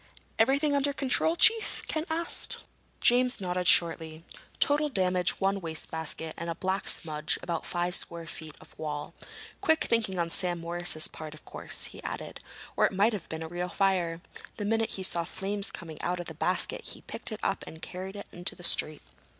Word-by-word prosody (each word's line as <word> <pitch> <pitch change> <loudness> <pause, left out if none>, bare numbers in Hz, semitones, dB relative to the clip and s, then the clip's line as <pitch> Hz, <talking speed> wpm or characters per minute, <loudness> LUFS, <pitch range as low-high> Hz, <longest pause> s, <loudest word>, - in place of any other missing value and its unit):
"Everything 280 +5 +4
under 280 0 +2
control, 275 +4 +3
Chief?" 445 +5 +5
Ken 315 0 -1
asked. 330 +1 0 0.4
James 250 +1 +5
nodded 180 -1 -1
shortly. 160 -2 +3 0.4
"Total 295 +1 +3
damage 185 -6 +1
one 195 0 +1
wastebasket 160 -1 -2
and 170 +1 -3
a 165 - -2
black 190 +2 -1
smudge 150 -1 0
on - - -22
about 170 -2 -3
five 175 0 -1
square 170 -1 0
feet 155 -1 -8
of - - -16
wall. 150 -2 -4 0.5
Quick 320 0 +3
thinking 220 -5 +1
on 170 -1 0
Sam 175 -1 +1
Morris's 170 -1 0
part, 155 -1 -8
of 155 - -16
course," - - -1
he - - -6
added, - - -5 0.4
"or - - +5
it - - -6
might 205 +4 +3
have 205 - -5
been 160 0 -4
a - - -5
real 175 +2 -3
fire. 180 -4 +1 0.4
The 210 - -2
minute 225 +1 +1
he 190 - -2
saw 170 -2 +2
flames 200 +4 0
coming 160 -3 -8
out 180 +1 -1
of 175 - -4
the - - -7
basket - - 0
he - - -7
picked - - -3
it - - -5
up - - 0
and 160 - -9
carried 185 +3 -7
it 200 - -6
into 175 +1 0
the 175 - -13
street." 155 -3 +2
180 Hz, 190 wpm, -29 LUFS, 165-215 Hz, 0.5 s, Chief